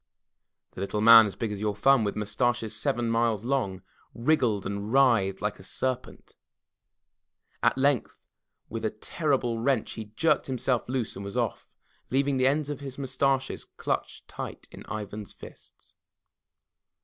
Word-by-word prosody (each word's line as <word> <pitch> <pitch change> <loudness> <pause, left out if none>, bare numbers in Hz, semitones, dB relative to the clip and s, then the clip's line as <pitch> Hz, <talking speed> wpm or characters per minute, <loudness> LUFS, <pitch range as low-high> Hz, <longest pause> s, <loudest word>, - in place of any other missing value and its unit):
The - - -8
Little 100 +2 -2
Man 115 0 +9
As 100 - -6
Big 115 -2 -3
As 105 -1 -5
Your 105 -1 0
Thumb 135 +3 +4
With 100 - -1
Mustaches 110 +2 -1
Seven 120 -5 -1
Miles 115 -2 +1
Long 115 -9 -1 0.3
wriggled 120 -6 +1
and 100 +1 -4
writhed 115 -8 +3
like 105 0 -2
a - - -12
serpent. 130 +5 -4 1.3
At - - +3
length 135 -2 +1 0.5
with - - -5
a - - +1
terrible 135 -7 -1
wrench, 125 -1 +1
he 110 - -6
jerked 110 +10 +1
himself 130 -2 -1
loose 125 -4 -2
and 100 - -7
was 100 0 -6
Off, - - -2 0.4
leaving 135 +1 +1
the 130 0 +3
ends 145 +1 +1
of 145 - -5
his 135 -2 -8
mustaches 135 0 0
clutched - - -3
tight - - -7
in - - -10
Ivan's 105 -1 -6
fists. - - -15
120 Hz, 150 wpm, -27 LUFS, 105-135 Hz, 1.3 s, Man